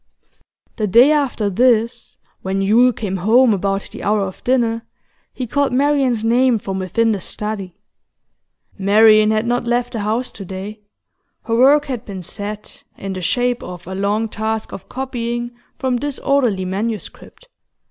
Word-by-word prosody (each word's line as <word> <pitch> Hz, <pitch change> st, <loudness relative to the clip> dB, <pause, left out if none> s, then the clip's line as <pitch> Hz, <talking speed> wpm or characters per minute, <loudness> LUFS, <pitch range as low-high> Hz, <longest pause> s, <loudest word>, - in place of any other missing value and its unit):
The 215 Hz, -, 0 dB
day 240 Hz, +9 st, +6 dB
after 275 Hz, -8 st, 0 dB
this, 235 Hz, +3 st, +1 dB, 0.2 s
when 190 Hz, +1 st, -2 dB
Yule 225 Hz, +6 st, +4 dB
came 200 Hz, -5 st, -4 dB
home 225 Hz, +6 st, +4 dB
about 195 Hz, 0 st, -1 dB
the -, -, -8 dB
hour 210 Hz, 0 st, +1 dB
of 190 Hz, -1 st, -5 dB
dinner, 235 Hz, -3 st, +1 dB, 0.5 s
he 255 Hz, -, -5 dB
called 280 Hz, +4 st, 0 dB
Marian's 265 Hz, -3 st, +1 dB
name 240 Hz, +1 st, +3 dB
from 195 Hz, -2 st, -4 dB
within 225 Hz, +5 st, +1 dB
the 205 Hz, -, -1 dB
study. 200 Hz, -1 st, -5 dB, 1.0 s
Marian 215 Hz, +2 st, +5 dB
had 215 Hz, +1 st, +1 dB
not 240 Hz, 0 st, -1 dB
left 240 Hz, 0 st, 0 dB
the 225 Hz, -, -3 dB
house 220 Hz, +5 st, -1 dB
to 200 Hz, -, -9 dB
day; 195 Hz, +3 st, -7 dB, 0.6 s
her 230 Hz, -, -1 dB
work 280 Hz, +5 st, +5 dB
had 255 Hz, -5 st, -4 dB
been 195 Hz, -5 st, -8 dB
set, 205 Hz, +4 st, -6 dB
in 195 Hz, 0 st, -5 dB
the 185 Hz, -, -5 dB
shape 245 Hz, +6 st, 0 dB
of 180 Hz, -1 st, -9 dB
a 190 Hz, -, -6 dB
long 205 Hz, +3 st, 0 dB
task 220 Hz, 0 st, -3 dB
of 190 Hz, -, -9 dB
copying 240 Hz, -2 st, -4 dB, 0.3 s
from 260 Hz, -2 st, 0 dB
disorderly 265 Hz, -7 st, 0 dB
manuscript. 215 Hz, -, -5 dB
225 Hz, 155 wpm, -19 LUFS, 200-245 Hz, 1.0 s, day